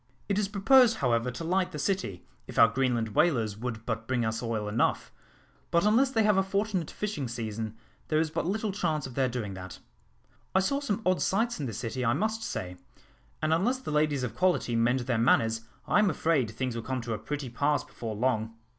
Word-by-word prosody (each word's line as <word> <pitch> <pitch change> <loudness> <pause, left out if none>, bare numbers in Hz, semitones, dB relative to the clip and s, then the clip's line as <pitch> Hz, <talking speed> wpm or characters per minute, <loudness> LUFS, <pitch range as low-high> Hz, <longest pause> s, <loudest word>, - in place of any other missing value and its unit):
It 200 0 +1
is 205 - +1
proposed, 225 +4 +5
however, 120 -1 +1
to 125 +6 -6
light 180 +2 +1
the - - -6
city, 150 - -2 0.2
if - - -9
our - - +8
Greenland 120 -1 0
whalers 115 -5 +2
would 115 0 -5
but 115 -1 -3
bring 125 -3 0
us 110 0 -2
oil 115 -3 -2
enough; 105 +3 0 0.6
but 170 +3 +2
unless 235 +6 +4
they 225 -4 +2
have 210 -2 +4
a - - +5
fortunate 195 -3 -1
fishing 205 -11 -3
season, 110 -2 -4 0.3
there 155 - +2
is 160 -1 0
but 165 - -2
little 215 +2 -1
chance 160 -7 -1
of 130 - -7
their 130 0 +1
doing 115 -5 -4
that. 90 -2 -8 0.8
I - - +6
saw 275 +9 +1
some 225 -6 -2
odd 185 0 +2
sights 230 +3 +1
in 140 - -2
the - - -4
city, 115 +4 -3
I 120 -1 +3
must 220 +6 -1
say; 90 - -4 0.7
and 155 +1 +3
unless 220 +11 +2
the 260 - -6
ladies 150 -3 +1
of 120 -3 -3
quality 180 -10 +1
mend 120 +3 +2
their 120 -2 0
manners, 115 -1 +3 0.3
I - - +4
am 210 -2 +4
afraid 155 -10 +1
things 125 +2 -3
will 115 - -3
come 130 +2 -3
to 115 -1 -3
a 105 - -3
pretty 140 0 -5
pass 145 +4 +1
before 110 -2 -6
long." 115 -1 0
130 Hz, 215 wpm, -29 LUFS, 115-190 Hz, 0.8 s, our